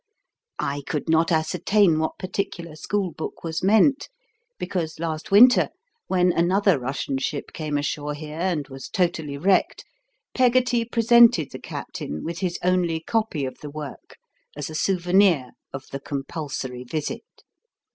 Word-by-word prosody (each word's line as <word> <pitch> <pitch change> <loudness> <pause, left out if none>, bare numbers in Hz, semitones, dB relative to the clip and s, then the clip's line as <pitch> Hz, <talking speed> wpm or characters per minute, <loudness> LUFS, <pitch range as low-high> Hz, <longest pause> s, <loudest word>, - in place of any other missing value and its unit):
I 140 +1 -2
could 150 0 -3
not 165 +2 +3
ascertain 165 +2 +2
what 160 - -2
particular 175 -4 -4
school 190 +4 -2
book 160 - -7
was 165 -1 -3
meant, 220 +8 +3 0.5
because 180 -4 -3
last 160 +3 -4
winter, 240 +6 +7 0.4
when 180 -1 +3
another 185 -1 +3
Russian 135 +1 -3
ship 140 +1 -4
came 150 -2 -2
ashore 145 0 -2
here 155 +1 -8
and 170 -6 -1
was 135 0 -9
totally 165 -7 -1
wrecked, 185 +6 +1 0.5
Peggotty 245 -2 +3
presented 230 - +5
the - - -8
captain 75 - -6
with 170 +1 -4
his 180 -3 -2
only 180 -3 +1
copy 215 -7 -1
of 130 - -7
the 150 - -8
work 150 -1 -9 0.4
as 145 +1 -5
a - - -7
souvenir 180 -6 +2 0.2
of 135 - -7
the 135 - -4
compulsory 135 -2 -5
visit. 155 - -6
165 Hz, 140 wpm, -24 LUFS, 145-195 Hz, 0.5 s, winter